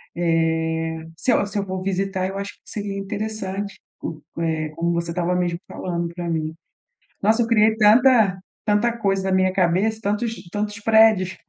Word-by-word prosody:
eh, 160 -1 0 0.2
se 255 - +1
eu 205 - +2
se 200 0 -3
eu 200 - -2
for 190 -1 -4
visitar, 195 0 -1
eu 195 +1 -5
acho 200 +1 -5
que - - -30
seria 200 -2 -5
interessante 200 0 -4 0.2
o 155 -2 -6 0.2
eh, 160 -2 -1
como 170 +1 0
você 170 0 -2
tava 180 +1 0
mesmo 175 -1 -1
falando 170 -2 -3
pra 175 -1 -4
mim. 160 -1 -2 0.7
Nossa, 220 +3 +4
eu 225 - 0
criei 220 -1 +4
tanta 220 -2 +5 0.3
tanta 220 +3 +2
coisa 195 -3 +1
na 190 - 0
minha 185 0 +2
cabeça, 190 +4 +1
tantos 220 +3 -1 0.2
tantos 205 +1 -3
prédios, 220 -4 +4
195 Hz, 170 wpm, -22 LUFS, 170-210 Hz, 0.7 s, tanta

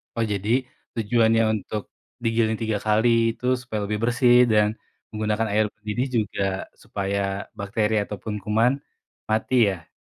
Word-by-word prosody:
Oh, 115 - +1
jadi 100 +2 -3 0.5
tujuannya 115 0 +3 0.2
untuk 105 0 -5 0.4
digiling 115 -1 +2
3 110 -2 0
kali 110 +2 +3 0.3
itu 125 - -9 0.2
supaya 110 -4 -4
lebih 105 +1 -2
bersih 120 0 +4 0.2
dan 105 -1 +4 0.4
menggunakan 110 +1 -1
air 110 +1 +3
mendidih 105 +5 -2
juga 100 -1 -5 0.4
supaya 100 0 -2 0.4
bakteri 105 +2 0
ataupun 105 +1 -6
kuman 110 +4 +3 0.6
mati 110 +4 +1 0.2
ya? 85 -3 -11
110 Hz, 130 wpm, -24 LUFS, 105-115 Hz, 0.6 s, bersih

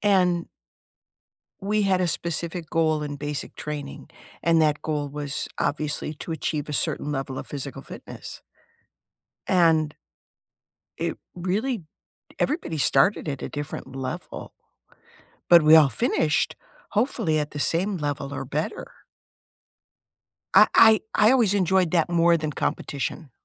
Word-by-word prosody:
and 180 -4 +2 1.2
we 210 +2 +1
had 190 -2 +2
a 180 - +2
specific 170 0 -3
goal 155 -2 +1
in 145 -1 -4
basic 145 0 -5
training, 150 -2 -7 0.3
and 165 -1 +4
that 150 -1 +2
goal 150 -2 -2
was 145 +1 -4
obviously 150 +1 -1
to 155 - -9
achieve 155 -1 -3
a - - -4
certain 145 - -1
level 135 -2 -3
of - - -7
physical 140 -1 -6
fitness. - - -10 1.1
And 160 -4 +3 1.0
it - - -2 0.2
really 195 +6 -2 0.6
everybody 280 - -1
started 155 +6 +2
at 140 -2 -4
a - - -3
different 145 -2 -6
level 135 +6 -6 1.0
but 170 -2 +9
we 155 +1 +8
all 150 -3 +7
finished, 150 +5 0 0.3
hopefully, 205 - 0
at 150 -1 -2
the 145 - -6
same 185 +7 0
level 145 -3 -3
or - - -4
better. 150 +4 -4 1.6
I - - +9
I 220 -1 +7
I 210 +2 +5
always 230 -7 +3
enjoyed 185 -3 +2
that 170 -1 +2
more 170 0 +4
than 155 -2 -3
competition. 140 +2 -3
155 Hz, 130 wpm, -25 LUFS, 145-180 Hz, 1.6 s, but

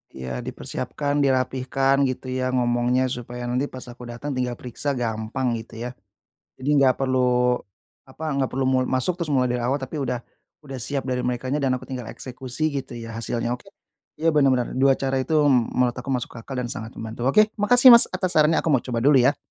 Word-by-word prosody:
Ya 65 -1 -5
dipersiapkan, 145 0 -3
dirapihkan 135 0 +1
gitu 130 0 -4
ya, 130 0 -1
ngomongnya 125 +1 +1
supaya 120 0 -6
nanti, 125 +3 -1
pas 130 -2 -9
aku 120 0 -11
datang 120 +5 -5
tinggal 125 -2 -2
periksa 130 +4 -4
gampang 115 +1 -2
gitu 110 0 -12
ya. 125 - -3 0.7
Jadi 130 +2 -4
nggak 130 -2 +4
perlu 130 0 +1 0.9
apa, 160 - -10 0.2
nggak 130 - 0
perlu 135 +1 -1
mu 130 0 +3
masuk 130 +7 +1
terus 165 - -2
mulai 130 -3 +2
dari 125 - -1
awal 130 +4 +1
tapi 140 +2 -5
udah 125 -2 -1 0.5
udah 135 -2 -7
siap 135 +2 -3
dari 125 -1 -1
merekanya 130 +3 -2
dan 130 -2 +1
aku - - -12
tinggal 125 -4 -6
eksekusi 130 +5 -4
gitu, 135 -3 -5
ya 115 0 -7
hasilnya 115 +1 -2
oke, 125 - -9 0.5
iya 165 +1 +2
bener 145 -2 +4
bener. 125 -2 0
2 135 0 +5
cara 135 -1 -1
itu 155 +4 -1 0.2
menurut 125 0 +2
aku 125 +1 -9
masuk 125 -2 -2
akal 130 +4 -8
dan 125 - -1
sangat 115 -5 -6
membantu. 115 +3 -4
Oke 215 +8 +4
makasih, 245 +5 +7
Mas, 235 - +8
atas 185 -1 -2
sarannya 155 +1 +4
aku - - 0
mau 130 - +3
coba 125 -2 -4
dulu 140 -2 +6
ya. 140 +4 +3
130 Hz, 200 wpm, -23 LUFS, 120-140 Hz, 0.9 s, Mas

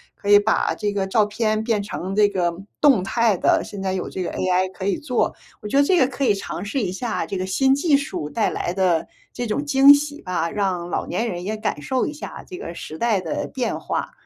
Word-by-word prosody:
可 205 - -6
以 205 - +9
把 210 +2 +1
这 205 - -2
个 195 -1 -1
照 210 +2 +3
片 215 +1 -1
变 220 -3 0
成 195 -2 -5
这 210 -1 +5
个 175 -4 0 0.3
动 270 -9 +5
态 230 -3 +2
的， - - +3
现 200 -2 -8
在 190 -1 -1
有 185 - -3
这 185 - -5
个 - - -3
AI 185 0 +1
可 190 - -6
以 200 -2 +1
做。 250 -5 0 0.3
我 210 - -6
觉 275 - +1
得 285 - +6
这 365 +5 +3
个 260 -6 +4
可 275 +2 -4
以 210 - +4
尝 195 -2 -5
试 250 +5 -2
一 185 - -1
下 225 +5 -3
这 195 - -4
个 185 - -2
新 265 +8 +3
技 290 +1 +3
术 275 - -4
带 220 +6 0
来 175 - -3
的 180 -4 +1 0.3
这 245 - -3
种 285 +7 -2
惊 275 0 +8
喜 290 +1 -2
吧， 175 -3 -2
让 185 -3 -2
老 - - -2
年 225 +7 -1
人 175 -3 -5
也 215 +3 -3
感 210 -9 -3
受 255 - 0
一 - - -4
下 300 - -8
这 365 - -8
个 170 - -7
时 155 -2 -8
代 220 +1 +1
的 170 -4 -3
变 250 -2 -1
化。 - - -3
210 Hz, 270 characters per minute, -22 LUFS, 185-250 Hz, 0.3 s, 以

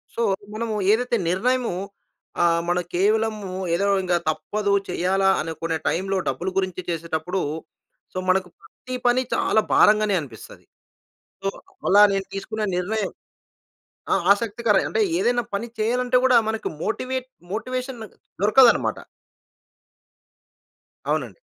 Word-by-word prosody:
So, - - -2 0.3
మనము 225 0 -2 0.2
ఏదైతే 240 +2 +2
నిర్ణయము 240 +3 +1 0.7
ఆహ్, 170 -1 +3
మన 175 0 +2
కేవలం 215 +4 +2 0.4
ఏదో 195 +4 0 0.2
ఇంక 180 -1 -1 0.2
తప్పదు 200 +6 -1 0.2
చేయాలా 190 +2 +1
అనుకునే 165 0 -3
టైమ్‌లో 195 +2 0
డబ్బులు 180 - -1
గురించి 185 -1 -1
చేసేటప్పుడు, 170 +2 -2 0.7
సో, - - -6
మనకు 185 -1 +2
ప్రతి 255 0 -9
పని 250 +2 +3
చాలా 220 - +2
భారంగానే 210 -1 +5
అనిపిస్తది. 120 -7 -12 0.8
సో, 195 - 0 0.4
అలా 205 +2 +7
నేను 195 0 -1
తీసుకున్న 215 +2 -3
నిర్ణయం, 200 +3 -1 1.0
ఆహ్, - - 0
ఆసక్తికర 210 0 0
అంటే 445 - +1 0.2
ఏదైనా 240 0 +1
పని 230 +4 -2
చేయాలంటే 250 +3 +2
కూడా, 255 -2 +6
మనకి 220 0 -2
మోటివేట్ 255 +3 -3 0.2
మోటివేషన్ 255 +2 -4 0.4
దొరకదన్నమాట. 230 +4 +5 2.1
అవునండి. - - -2
210 Hz, 110 wpm, -23 LUFS, 185-235 Hz, 2.1 s, అలా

